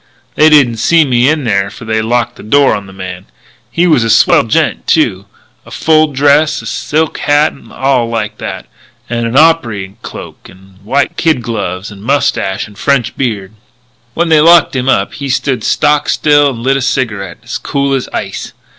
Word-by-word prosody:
"They 155 - +4
didn't 135 -7 +4
see 165 +7 +3
me 125 0 +2
in 155 -1 0
there 100 -4 0
for 115 - -12
they 110 0 -1
locked 120 +1 -1
the - - -11
door 140 +5 +3
on 100 -2 -5
the - - -12
man. 90 -1 -8 0.4
He 175 - +1
was 155 -9 +3
a 115 - -1
swell - - +4
gent, - - -1
too, 95 +1 +1 0.4
in - - -16
full 155 -1 +2
dress 145 +2 +2
and - - -9
silk 155 +1 -2
hat 145 +1 +2
and - - -17
all 130 -3 0
like 105 -2 -4
that, - - -6 0.5
and 120 -1 -1
a 125 +5 +2
opry 115 -12 +1
cloak - - -10
and 95 +1 -19
white 135 +7 -1
kid 155 -7 +1
gloves, 105 -4 -4
and 100 -1 -12
mustache 110 -6 -1
and 105 -1 -16
French 140 -5 0
beard. 105 -6 -3 0.6
"When 170 0 0
they 155 -2 +5
locked 165 -2 +5
him 130 0 -1
up - - +1
he 140 -1 -6
stood 130 -3 -1
stock 150 0 +1
still 145 -1 +3
and 115 -3 -7
lit 135 +1 +2
a - - -3
cigarette, 105 -8 -2
as - - -5
cool 140 0 -1
as 135 -2 -2
ice. - - -5
130 Hz, 190 wpm, -12 LUFS, 105-145 Hz, 0.6 s, they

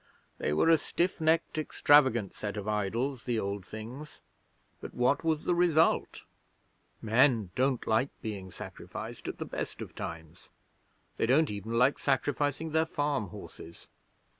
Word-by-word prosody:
They - - -1
were 75 - +2
a 165 -1 +6
stiff 175 +3 -1
necked, 160 0 +2
extravagant 130 -8 +3
set 105 0 -5
of 105 0 -5
idols, 115 +5 -1
the 120 -3 0
Old 100 -1 -3
Things. 120 +10 -9 0.6
But - - -9
what 125 +5 +2
was 160 -2 0
the 180 - +1
result? 170 -2 +2 0.8
Men 115 -3 +3
don't 130 -1 0
like 115 +5 +2
being 100 -5 -6
sacrificed 105 +4 -8
at - - -4
the - - -4
best - - -5
of - - -7
times; 80 -1 -8 0.7
they - - +1
don't 145 +3 +4
even 105 +2 -5
like 125 +4 +3
sacrificing 145 +3 0
their 160 +1 +2
farm 145 -8 -1
horses. 85 -1 -11
125 Hz, 145 wpm, -30 LUFS, 105-145 Hz, 0.8 s, a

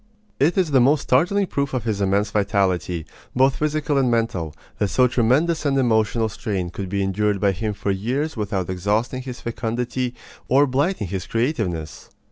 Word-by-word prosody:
It 160 +8 +2
is 180 -5 +2
the 135 -2 +5
most 140 +4 +4
startling 180 +10 +2
proof 140 -6 -2
of 125 - -1
his 110 -3 -2
immense 100 +2 +1
vitality, 95 -5 0 0.3
both 135 +1 +3
physical 150 -1 0
and 130 -2 +2
mental, 105 -10 -1 0.2
that 105 - +2
so 125 +6 +3
tremendous 130 +8 +2
an 140 -2 +1
emotional 115 -2 +2
strain 100 -6 -3
could 95 0 -5
be 100 +1 0
endured 100 +1 0
by 100 0 +3
him 105 +3 -3
for 100 - -2
years 130 +11 -2
without 100 -5 -2
exhausting 105 +8 -1
his 125 -1 -8
fecundity 120 +2 -3 0.3
or 140 +3 +5
blighting 140 - 0
his 95 0 -4
creativeness. 110 - -2
115 Hz, 170 wpm, -22 LUFS, 100-135 Hz, 0.3 s, the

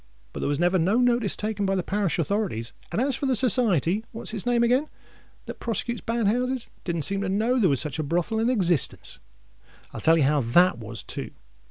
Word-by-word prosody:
But - - -6
there - - -2
was 145 - 0
never 175 +3 +2
no 190 +7 +2
notice 245 -4 +2
taken 210 -1 -3
by 195 - +1
the 185 - -1
parish 195 -3 -1
authorities; 170 - -2 0.2
and - - -1
as 265 +1 +1
for 275 - -3
the 260 - +2
Society—what's 220 - +2
its 220 +1 -3
name 240 -1 +2
again?—that 255 +6 -4
prosecutes 235 +1 -3
bad 230 -1 -2
houses, 250 +4 -1
it - - -34
didn't 170 -3 -2
seem 195 +6 +2
to 195 - -2
know 225 +6 +1
there 195 -6 +3
was 140 -3 +2
such 150 0 -4
a - - 0
brothel 175 +8 -1
in 230 +2 +1
existence. 180 - -1 0.4
And - - -32 0.2
I'll - - -7
tell 165 +1 +4
you 155 - +3
how 145 +1 +2
that 155 +6 +3
was, 115 0 -7
too. - - -6
200 Hz, 215 wpm, -25 LUFS, 165-235 Hz, 0.4 s, tell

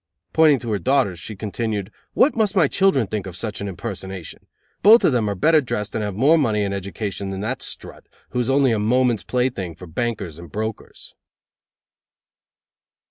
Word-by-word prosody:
Pointing 155 -3 +5
to 120 -2 -5
her 105 - 0
daughters 130 -10 +1
she 105 +4 -6
continued: 105 0 -3 0.2
"What 285 - +4
must 215 -3 +1
my 170 -7 +5
children 190 - +2
think 100 -1 -4
of 90 - -8
such 105 +1 -5
an 100 - -3
impersonation? 95 -3 -7 0.3
Both 220 +3 +7
of - - +4
them 115 -4 +1
are 100 - -2
better 155 - +4
dressed 105 -5 -3
and 110 - -2
have 105 -2 -3
more 145 +9 +4
money 110 -7 +1
and 100 -1 -2
education 100 0 -4
than 95 0 -4
that 120 +4 -3
strut, - - -7 0.2
who 125 - -1
is 120 +1 0
only 135 -1 +3
a 110 - +1
moment's 120 0 +2
plaything 125 -10 -2
for 90 - -11
bankers 95 -2 -3
and 85 -1 -11
brokers!" 110 +1 -6
110 Hz, 185 wpm, -22 LUFS, 100-130 Hz, 0.3 s, Both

